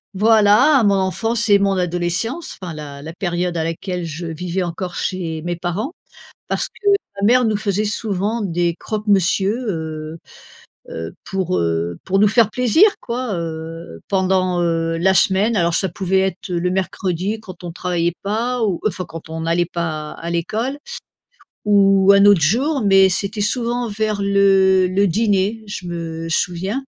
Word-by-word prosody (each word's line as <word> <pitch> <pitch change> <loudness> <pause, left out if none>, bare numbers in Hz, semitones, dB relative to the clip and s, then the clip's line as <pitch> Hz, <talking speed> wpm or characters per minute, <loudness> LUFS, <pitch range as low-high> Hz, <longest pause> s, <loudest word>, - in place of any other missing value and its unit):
voilà, 220 +6 +5
mon 200 - +4
enfance 220 +5 -1
et 200 -1 +6
mon 200 0 +2
adolescence, 180 - -2
enfin 180 -3 -6
la 145 -2 -8
la 160 - -7
période 175 0 -2
à 160 - 0
laquelle 175 +2 -4
je 165 +2 -6
vivais 175 +3 -3
encore 175 +1 -5
chez 165 -4 -3
mes 175 0 -2
parents. 180 - -3 0.6
Parce - - -1
que 410 - -8 0.3
ma - - +2
mère 250 +2 +5
nous 220 -3 +1
faisait 205 -1 -1
souvent 210 +1 -2
des 175 -3 0
croques 215 0 -4
monsieur, 195 +1 +2
heu 160 -2 -4 0.7
heu, 80 0 -6
pour 190 - -1
heu 85 0 -1
pour 195 +1 +1
nous 210 - +5
faire 220 0 +3
plaisir 250 - +4 0.2
quoi, 240 -3 -3
heu, 165 - -6
pendant, 185 -2 +1
heu, 165 -1 0
la 190 +3 +3
semaine. 195 +5 +3
Alors 170 -2 +1
ça 190 - +1
pouvait 190 +2 0
être 190 0 -2
le 175 +1 0
mercredi 190 +2 -2
quand 185 -4 -12
on 175 - -5
travaillait 175 -1 -1
pas 230 +4 -1
ou 195 -5 0
enfin 185 -3 -1
quand 165 -1 -9
on 160 0 -5
n'allait 170 +2 +1
pas 155 -3 -4
à 170 - -6
l'école, 220 - -2 0.9
ou 195 -1 +5
un 200 0 +6
autre 200 -5 +6
jour, 260 - +1
mais 195 -1 +6
c'était 200 +3 -2
souvent 240 +2 -1
vers 215 -1 -2
le 195 -1 +4
le 190 +2 +2
dîner, 205 +2 +1
je 200 -3 -6
me 165 -1 -5
souviens, 190 +10 -1
190 Hz, 165 wpm, -19 LUFS, 170-210 Hz, 0.9 s, et